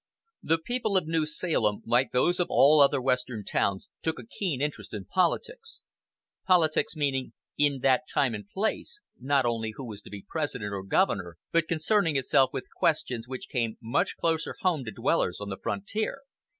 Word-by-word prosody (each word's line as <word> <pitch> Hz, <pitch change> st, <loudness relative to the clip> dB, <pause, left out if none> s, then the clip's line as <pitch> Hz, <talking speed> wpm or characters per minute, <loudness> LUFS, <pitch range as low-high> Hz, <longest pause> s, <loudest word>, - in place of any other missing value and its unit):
The 165 Hz, -, +2 dB
people 220 Hz, +3 st, -1 dB
of 185 Hz, -, +1 dB
New 160 Hz, -1 st, 0 dB
Salem, 120 Hz, -, 0 dB
like 120 Hz, +3 st, +2 dB
those 175 Hz, +8 st, +2 dB
of 180 Hz, -, +2 dB
all 150 Hz, +2 st, +6 dB
other 140 Hz, 0 st, +5 dB
Western 125 Hz, -4 st, -1 dB
towns, 100 Hz, 0 st, -1 dB
took 160 Hz, 0 st, -1 dB
a -, -, -9 dB
keen 185 Hz, -, -3 dB
interest 135 Hz, -8 st, -3 dB
in 100 Hz, -2 st, -6 dB
politics; 455 Hz, -, -1 dB, 0.6 s
"politics" 170 Hz, -4 st, +3 dB
meaning, 135 Hz, -4 st, -1 dB, 0.2 s
in 145 Hz, -3 st, +1 dB
that 135 Hz, +3 st, +3 dB
time 125 Hz, -4 st, +2 dB
and 105 Hz, -1 st, -7 dB
place, 220 Hz, -, -2 dB, 0.2 s
not 135 Hz, +1 st, +2 dB
only 115 Hz, -2 st, -1 dB
who 135 Hz, -, -7 dB
was 105 Hz, -3 st, -8 dB
to -, -, -13 dB
be 100 Hz, -1 st, -9 dB
President 125 Hz, -10 st, -3 dB
or 100 Hz, -, -3 dB
governor, 95 Hz, -, 0 dB
but 165 Hz, -1 st, +2 dB
concerning 165 Hz, 0 st, +1 dB
itself 135 Hz, 0 st, +3 dB
with -, -, -4 dB
questions 120 Hz, -2 st, 0 dB
which 130 Hz, 0 st, -6 dB
came 115 Hz, -3 st, -2 dB
much 125 Hz, -, -1 dB
closer 165 Hz, -1 st, -1 dB
home 175 Hz, -8 st, +1 dB
to 110 Hz, -, -5 dB
dwellers 90 Hz, -2 st, 0 dB
on 100 Hz, 0 st, -6 dB
the 95 Hz, -, -4 dB
frontier. 215 Hz, +6 st, -3 dB
140 Hz, 175 wpm, -28 LUFS, 115-165 Hz, 0.6 s, all